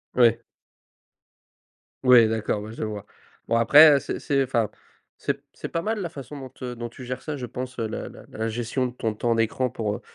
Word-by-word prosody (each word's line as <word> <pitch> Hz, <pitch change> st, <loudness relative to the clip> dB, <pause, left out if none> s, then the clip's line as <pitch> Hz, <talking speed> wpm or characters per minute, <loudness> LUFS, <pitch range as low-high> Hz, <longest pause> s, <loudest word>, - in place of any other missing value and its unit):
Ouais. 120 Hz, -3 st, +5 dB, 1.6 s
Ouais, 125 Hz, -3 st, +7 dB
d'accord, 110 Hz, -1 st, -1 dB
ouais, 110 Hz, +1 st, -8 dB
je -, -, -5 dB
vois. 105 Hz, -2 st, -5 dB, 0.4 s
Bon 115 Hz, -, +1 dB
après, 145 Hz, +6 st, +8 dB
heu, 140 Hz, -, +3 dB
c'est -, -, -4 dB
c'est, 140 Hz, -1 st, +1 dB
enfin 115 Hz, -5 st, 0 dB, 0.5 s
c'est -, -, -1 dB
p -, -, -20 dB
c'est -, -, -6 dB
pas 165 Hz, -, -2 dB
mal 215 Hz, +4 st, -1 dB
la 175 Hz, -, -3 dB
façon 145 Hz, -2 st, -9 dB
dont, 130 Hz, -2 st, -9 dB
heu, 125 Hz, -1 st, -4 dB
dont 120 Hz, 0 st, -5 dB
tu 125 Hz, -, -11 dB
gères 125 Hz, +1 st, -5 dB
ça, 150 Hz, -2 st, -4 dB
je 125 Hz, -, -5 dB
pense, 125 Hz, +1 st, -6 dB
heu, 115 Hz, -, 0 dB
la 110 Hz, -, -5 dB
la -, -, -12 dB
la 110 Hz, +1 st, -3 dB
gestion 120 Hz, +3 st, -1 dB
de 125 Hz, -, -3 dB
ton 115 Hz, -3 st, -3 dB
temps 115 Hz, +2 st, +1 dB
d'écran 115 Hz, +3 st, +1 dB
pour, 110 Hz, -4 st, -2 dB
heu, -, -, -9 dB
120 Hz, 225 wpm, -25 LUFS, 115-135 Hz, 1.6 s, après